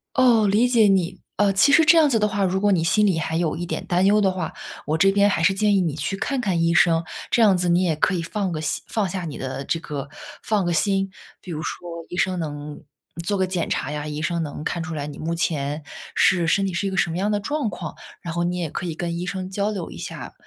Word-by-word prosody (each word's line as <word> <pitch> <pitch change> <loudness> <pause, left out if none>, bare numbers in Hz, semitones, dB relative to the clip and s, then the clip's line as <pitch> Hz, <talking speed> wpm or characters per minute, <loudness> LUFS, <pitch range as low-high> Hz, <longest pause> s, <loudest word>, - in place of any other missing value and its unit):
哦， 240 -5 +5
理 210 +5 +3
解 235 -4 +4
你。 190 -2 +1 0.2
呃， 205 -1 +3
其 275 +9 +5
实 320 +2 +6
这 330 +2 +7
样 310 -2 +5
子 230 -4 +2
的 210 - +2
话 205 -1 -1
如 190 0 +1
果 205 +1 +2
你 170 -3 +1
心 190 +6 +3
里 190 -5 +2
还 160 0 -1
有 165 -2 0
一 175 - -4
点 - - -4
担 180 +1 +2
忧 205 +2 +5
的 200 -2 +3
话， 180 -3 -4 0.3
我 155 +1 0
这 195 +3 +5
边 200 +1 +4
还 200 - 0
是 185 +4 +4
建 205 +1 +2
议 - - +3
你 165 -5 -1
去 155 +6 -3
看 270 +5 -1
看 185 -7 0
医 165 0 +2
生。 165 -1 +4 0.3
这 235 - +3
样 205 -4 +6
子 180 0 0
你 175 +1 +3
也 165 -4 +1
可 155 - +1
以 175 - -1
放 190 +3 -2
个 160 - -3
心 155 - -2
放 215 -3 -1
下 185 0 -4
你 155 -4 -6
的 130 +1 -5
这 165 - -1
个 145 -3 -6 0.3
放 210 -4 0
个 175 - 0
心。 195 +3 +1 0.3
比 180 - -10
如 155 -1 -4
说 175 - -5 0.2
医 175 - -6
生 185 -1 +1
能 145 -2 -6 0.4
做 200 +3 +1
个 190 - +2
检 180 -2 -2
查 140 - -2
呀， 150 0 -4
医 150 0 -4
生 170 +1 -1
能 150 0 -6
看 170 - -2
出 165 +1 -5
来 145 -1 -4
你 145 -1 -8
目 165 +2 -3
前 150 -3 -2 0.3
是 175 -3 +3
身 195 +4 +2
体 190 - -2
是 175 +3 -1
一 - - 0
个 190 - -4
什 175 - +2
么 165 - -3
样 200 +3 0
的 205 - +1
状 285 +3 -2
况。 - - -7 0.3
然 170 -4 -5
后 170 +1 -1
你 175 +1 -1
也 170 -3 -2
可 175 - -5
以 170 - -3
跟 170 0 -3
医 175 - -3
生 185 0 -4
交 200 +2 -1
流 190 -5 -5
一 - - -9
下， - - -7
180 Hz, 300 characters per minute, -23 LUFS, 165-200 Hz, 0.4 s, 这